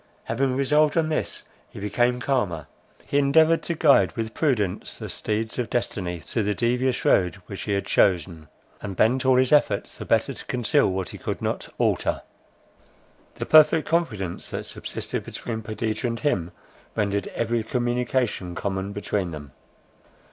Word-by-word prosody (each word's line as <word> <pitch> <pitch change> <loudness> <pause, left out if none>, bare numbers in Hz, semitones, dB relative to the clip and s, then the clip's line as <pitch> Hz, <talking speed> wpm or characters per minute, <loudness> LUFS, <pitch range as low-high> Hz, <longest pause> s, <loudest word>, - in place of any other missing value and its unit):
Having 130 +3 0
resolved 150 +3 +3
on 160 -1 +2
this, 155 - -2 0.3
he - - -10
became 120 +5 +1
calmer. 105 - -1 0.4
He 140 - +1
endeavoured 160 +4 +4
to 170 - -3
guide 150 -3 +4
with 110 -2 -4
prudence 110 - -1
the - - -6
steeds 110 +3 -2
of 120 -4 -1
destiny 90 -7 -2
through 110 - -2
the 105 0 0
devious 125 +2 0
road 90 -1 +3
which 100 - -7
he 105 - -2
had 100 - -1
chosen, 85 -4 +1 0.3
and 100 -2 -5
bent 130 +7 +2
all 130 - +6
his 130 0 +3
efforts 145 -9 +2
the - - -5
better - - +2
to - - -10
conceal 120 -6 +2
what 95 -1 -3
he - - -9
could - - -3
not - - -3
alter. - - 0 1.1
The - - -4
perfect 155 0 +6
confidence 110 - -1
that - - -4
subsisted - - -4
between 115 -2 -5
Perdita 110 +1 -2
and 115 -1 -3
him, 90 - 0 0.4
rendered 100 -2 0
every 115 0 0
communication 120 -5 -1
common 95 0 -3
between 100 -2 -2
them. 75 -4 -8
115 Hz, 160 wpm, -24 LUFS, 100-130 Hz, 1.1 s, all